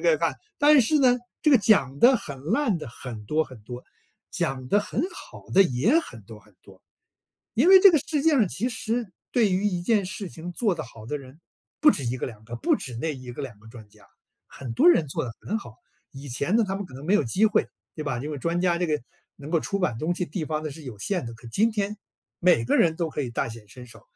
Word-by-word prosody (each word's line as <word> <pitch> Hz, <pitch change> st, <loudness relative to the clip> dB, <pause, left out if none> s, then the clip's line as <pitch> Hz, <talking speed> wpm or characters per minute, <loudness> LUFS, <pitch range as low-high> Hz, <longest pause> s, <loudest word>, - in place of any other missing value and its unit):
个 -, -, +3 dB
看。 -, -, 0 dB, 0.2 s
但 295 Hz, -1 st, +6 dB
是 300 Hz, +6 st, +2 dB
呢， 250 Hz, -2 st, +5 dB, 0.3 s
这 305 Hz, -, +3 dB
个 270 Hz, -, +8 dB
讲 140 Hz, -, +3 dB
得 255 Hz, +1 st, +7 dB
很 140 Hz, -9 st, -8 dB
烂 225 Hz, -, +1 dB
的 135 Hz, -, -7 dB
很 115 Hz, -2 st, -8 dB
多 155 Hz, +7 st, +1 dB
很 125 Hz, -7 st, -14 dB
多， 125 Hz, +3 st, -9 dB, 0.5 s
讲 130 Hz, -1 st, -2 dB
得 205 Hz, -, +3 dB
很 215 Hz, -, -3 dB
好 -, -, -12 dB
的 195 Hz, -, +6 dB
也 180 Hz, -, +2 dB
很 120 Hz, -, -10 dB
多 105 Hz, +1 st, -12 dB
很 105 Hz, -1 st, -24 dB
多。 95 Hz, -1 st, -18 dB, 0.7 s
因 265 Hz, +10 st, +3 dB
为 380 Hz, 0 st, +10 dB
这 395 Hz, -2 st, +9 dB
个 310 Hz, -, +4 dB
世 300 Hz, -3 st, 0 dB
界 320 Hz, +2 st, +4 dB
上 235 Hz, -10 st, +3 dB
其 235 Hz, +8 st, -2 dB
实 230 Hz, -3 st, -3 dB, 0.2 s
对 225 Hz, -5 st, +3 dB
于 185 Hz, +3 st, 0 dB
一 180 Hz, -4 st, 0 dB
件 205 Hz, 0 st, +1 dB
事 190 Hz, 0 st, -6 dB
情 175 Hz, +2 st, -8 dB
做 205 Hz, 0 st, +1 dB
得 155 Hz, -, -5 dB
好 115 Hz, -4 st, -13 dB
的 150 Hz, +5 st, -3 dB
人， 135 Hz, +4 st, -14 dB, 0.4 s
不 300 Hz, -1 st, +7 dB
止 135 Hz, -, -4 dB
1 120 Hz, -, -1 dB
个 -, -, -3 dB
2 110 Hz, -3 st, -12 dB
个， 120 Hz, +2 st, -7 dB
不 -, -, +1 dB
止 125 Hz, -, -7 dB
那 160 Hz, +4 st, -2 dB
1 125 Hz, -2 st, -9 dB
个 145 Hz, -, -6 dB
2 110 Hz, -7 st, -8 dB
个 110 Hz, -, -17 dB
专 110 Hz, -2 st, -13 dB
家， -, -, -22 dB, 0.4 s
很 130 Hz, -4 st, -8 dB
多 175 Hz, -, +6 dB
人 165 Hz, -3 st, +3 dB
做 -, -, -2 dB
得 115 Hz, -, -7 dB
很 215 Hz, -, -2 dB
好。 230 Hz, -, -10 dB, 0.4 s
以 135 Hz, 0 st, -10 dB
前 140 Hz, -, 0 dB
呢， 230 Hz, -, +4 dB
他 195 Hz, -, -2 dB
们 200 Hz, -1 st, -4 dB
可 130 Hz, -, -16 dB
能 135 Hz, +3 st, -9 dB
没 185 Hz, -, +2 dB
有 210 Hz, -, +4 dB
机 185 Hz, -, +2 dB
会， 215 Hz, -, +2 dB, 0.3 s
对 155 Hz, -, -5 dB
吧？ 135 Hz, -5 st, -2 dB
因 150 Hz, +4 st, -5 dB
为 145 Hz, -, -4 dB
专 170 Hz, +5 st, -1 dB
家 175 Hz, -2 st, +2 dB
这 175 Hz, -1 st, -1 dB
个， 150 Hz, -3 st, 0 dB, 0.4 s
能 145 Hz, +2 st, -9 dB
够 165 Hz, -1 st, +2 dB
出 200 Hz, -, -2 dB
版 125 Hz, -11 st, 0 dB
东 170 Hz, +5 st, -1 dB
西 180 Hz, -, -2 dB
地 160 Hz, +1 st, -4 dB
方 155 Hz, 0 st, -3 dB
的 155 Hz, -, -4 dB
是 155 Hz, +3 st, -11 dB
有 125 Hz, -6 st, -8 dB
限 180 Hz, -, -2 dB
的。 115 Hz, -, -7 dB
可 115 Hz, +1 st, -16 dB
今 220 Hz, -, +2 dB
天， 210 Hz, -1 st, -2 dB, 0.4 s
每 175 Hz, -10 st, +4 dB
个 115 Hz, -, +2 dB
人 160 Hz, -2 st, +3 dB
都 165 Hz, -1 st, -2 dB
可 150 Hz, -, -3 dB
以 125 Hz, -, -3 dB
大 115 Hz, -, -2 dB
显 110 Hz, -2 st, -11 dB
身 125 Hz, +4 st, -12 dB
手， 120 Hz, -, -15 dB
160 Hz, 270 characters per minute, -25 LUFS, 125-210 Hz, 0.7 s, 为